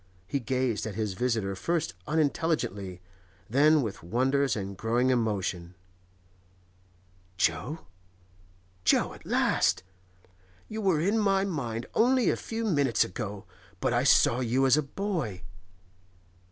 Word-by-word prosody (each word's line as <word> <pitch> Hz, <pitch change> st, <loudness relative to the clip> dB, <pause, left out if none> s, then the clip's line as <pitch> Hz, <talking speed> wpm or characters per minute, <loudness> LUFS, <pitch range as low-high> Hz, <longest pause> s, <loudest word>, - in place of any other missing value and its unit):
He 125 Hz, +9 st, -2 dB
gazed 125 Hz, -3 st, -1 dB
at 105 Hz, -, -6 dB
his 105 Hz, -3 st, -2 dB
visitor 110 Hz, -2 st, -1 dB
first 165 Hz, -, -1 dB
unintelligently, 145 Hz, -, -1 dB, 0.5 s
then 145 Hz, +5 st, +4 dB
with 110 Hz, -4 st, -5 dB
wonder 130 Hz, +10 st, +1 dB
and 100 Hz, -2 st, -5 dB
growing 120 Hz, +5 st, +1 dB
emotion. 100 Hz, -7 st, -1 dB, 1.6 s
'Jo?—Jo, 90 Hz, -, -3 dB
at -, -, -15 dB
last? 95 Hz, +1 st, +2 dB, 0.8 s
You 220 Hz, 0 st, -5 dB
were 190 Hz, -6 st, +2 dB
in 200 Hz, +7 st, +1 dB
my 195 Hz, -2 st, +2 dB
mind 120 Hz, -, -3 dB
only 250 Hz, +2 st, +3 dB
a -, -, 0 dB
few 225 Hz, 0 st, -4 dB
minutes 145 Hz, -, +2 dB
ago, 100 Hz, +1 st, -6 dB, 0.3 s
but -, -, 0 dB
I -, -, +2 dB
saw 120 Hz, -, +4 dB
you 130 Hz, +2 st, +1 dB
as 130 Hz, 0 st, +5 dB
a 155 Hz, -, +2 dB
boy. 140 Hz, -, -4 dB
120 Hz, 120 wpm, -28 LUFS, 95-155 Hz, 1.6 s, as